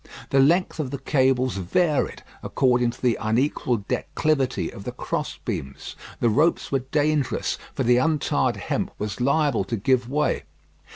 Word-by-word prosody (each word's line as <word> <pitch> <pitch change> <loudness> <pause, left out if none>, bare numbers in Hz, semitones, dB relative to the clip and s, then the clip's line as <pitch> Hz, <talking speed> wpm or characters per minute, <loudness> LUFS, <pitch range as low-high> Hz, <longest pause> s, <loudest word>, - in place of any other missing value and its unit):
The 135 - +4
length 165 +6 +3
of 145 -4 -2
the 140 - -4
cables 130 -4 +1
varied, 150 - 0 0.2
according 125 -2 +2
to 120 - -9
the 120 -2 +2
unequal 115 -1 0
declivity 140 -5 -1
of - - -9
the - - -4
cross - - -4
beams. 70 0 -5 0.2
The 120 - +2
ropes 155 +9 +2
were 135 - +2
dangerous, 145 +1 0 0.2
for - - 0
the 120 +1 +4
untarred 150 +3 +1
hemp - - -2
was 105 +3 -4
liable 140 -3 +2
to 115 - -2
give 125 +3 +1
way. 150 +1 0
130 Hz, 155 wpm, -24 LUFS, 120-150 Hz, 0.2 s, The